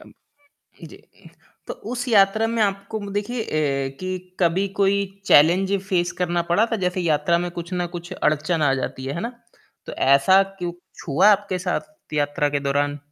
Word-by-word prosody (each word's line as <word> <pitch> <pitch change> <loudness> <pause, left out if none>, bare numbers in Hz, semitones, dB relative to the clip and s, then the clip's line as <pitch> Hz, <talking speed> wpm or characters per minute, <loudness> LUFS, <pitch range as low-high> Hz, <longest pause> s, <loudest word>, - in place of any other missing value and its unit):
अम, - - -16 0.7
जी। - - -13 0.6
तो - - -4 0.2
उस 245 +1 -3
यात्रा 215 +1 +4
में 225 - +2
आपको 200 +2 -2
म 200 -1 -7
देखिए 220 +3 -2
अ, 140 -4 -2
कि 185 0 -6
कभी 180 +3 +2
कोई 200 0 +3 0.2
चैलेंज 180 +6 +5 0.2
फेस 175 -2 0
करना 175 -1 0
पड़ा 210 +6 +4
था - - +2
जैसे 180 +1 -1
यात्रा 165 0 +2
में 175 0 -3
कुछ 170 +1 -8
न 175 -1 -1
कुछ 175 +2 -8
अड़चन 155 -1 0
आ 140 -2 +3
जाती 130 - -5
है। 135 +2 -4
है 170 - -4
ना? 235 +5 -4 0.5
तो - - -7
ऐसा 140 +9 +4 0.2
क्यों 175 -1 -3 0.3
छुआ 160 +7 +3
आपके 200 -2 +1
साथ 310 - -5
यात्रा 145 0 0
के 145 -1 -1
दौरान? 145 +1 -1
175 Hz, 180 wpm, -22 LUFS, 150-200 Hz, 0.7 s, चैलेंज